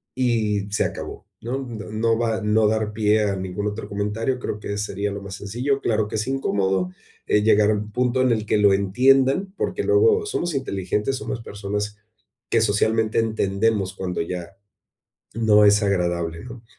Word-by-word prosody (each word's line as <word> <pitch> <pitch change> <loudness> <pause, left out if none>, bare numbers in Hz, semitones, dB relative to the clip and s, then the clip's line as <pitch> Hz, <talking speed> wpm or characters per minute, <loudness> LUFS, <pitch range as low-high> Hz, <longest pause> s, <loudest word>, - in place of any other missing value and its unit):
y 110 -5 0
se - - +1
acabó, - - -6
¿no? 125 +4 -3
No 115 -5 -7
no 115 +1 +1
va 115 -2 0
no 105 +1 +3
dar 110 0 0
pie 105 0 +2
a 100 -1 0
ningún 95 +2 -3
otro 105 +2 -5
comentario, 105 +5 -2
creo 105 -3 -4
que 100 - -4
sería 100 0 -2
lo 100 0 -6
más 100 -1 -7
sencillo. 125 +8 -2
Claro 110 -2 +1
que 105 - -5
es 110 - -1
incómodo, 95 -8 0 0.4
eh, 105 - +3
llegar 105 -1 +4
a - - +3
un 105 +1 -5
punto 125 +2 +1
en 130 - +3
el 110 -2 0
que - - +2
lo 100 -1 +5
entiendan, 135 - +3
porque - - -2
luego 430 +1 +4
somos 175 - -2
inteligentes, 105 -1 -1
somos 120 - -5
personas 105 0 -4 0.5
que 115 - +3
socialmente 110 +1 +2
entendemos 105 -2 0
cuando 90 -1 -4
ya 90 +2 -6 0.8
no 105 -2 +5
es 105 +1 +5
agradable, 85 -2 -1
¿no? 120 -1 -10
105 Hz, 175 wpm, -23 LUFS, 100-115 Hz, 0.8 s, lo